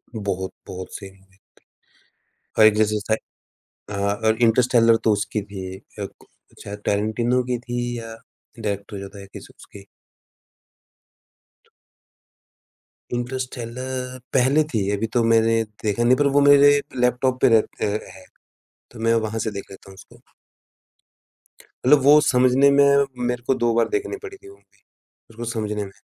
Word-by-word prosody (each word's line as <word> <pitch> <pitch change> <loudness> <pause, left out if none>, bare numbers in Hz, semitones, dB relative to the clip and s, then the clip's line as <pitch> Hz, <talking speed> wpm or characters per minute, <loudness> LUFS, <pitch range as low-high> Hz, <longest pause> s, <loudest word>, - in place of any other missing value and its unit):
बहुत 95 -3 -4
बहुत 95 0 -8
सही 95 -1 -9
मूवी 95 0 -26
थ - - -54 1.0
और 110 - +7
एक 110 -1 +6
जैसे 105 0 +1
स 110 +1 0 0.8
हाँ 100 0 -1
और 110 0 +3
इंटरस्टेलर 115 0 +4
तो 110 - +3
उसकी 105 +1 -2
भी 100 -2 -8
एक 95 - -15 0.2
अ, - - -2
को - - -21 0.3
चाहे 100 - -7
टारेंटिनो 110 +5 0
की 125 0 -2
थी 120 0 -4
या 115 0 -8 0.5
डायरेक्टर 100 -1 -4
जो 100 - -7
होता 100 +1 -11
है - - -10
किस - - -11
उसकी। 100 -1 -14 1.8
तो - - -32 1.4
इंटरस्टेलर 125 +1 -5
पहले 135 +4 +3
थी, 100 -3 0
अभी 115 +3 -2
तो 120 - +2
मैंने 115 0 +3 0.2
देखा 110 +2 0
नहीं 125 +2 +5
पर 145 - +2
वो - - +6
मेरे 145 0 +6 0.2
लैपटॉप 125 +1 +1
पे - - +6
रहते - - -4 0.3
है। 95 -1 -15 0.7
तो 120 - -12
मैं 115 0 +2
वहाँ 110 +1 -4
से 110 0 -2
देख 100 -1 -8
लेता 95 0 -13
हूँ - - -14
उसको। - - -17 1.6
मतलब 145 +2 +6
वो 145 +2 +7
समझने 130 +1 +4
में 140 0 +5 0.4
मेरे 120 0 -3
को - - +3
2 120 -1 +2
बार 115 - +2
देखनी 410 0 -2
पड़ी 395 -2 -9
थी 395 - -17
वो 395 - -14
मूवी, - - -32 0.5
उसको 115 +1 -8
समझने 105 -3 -3
में। 95 - -11
115 Hz, 160 wpm, -22 LUFS, 105-125 Hz, 1.8 s, और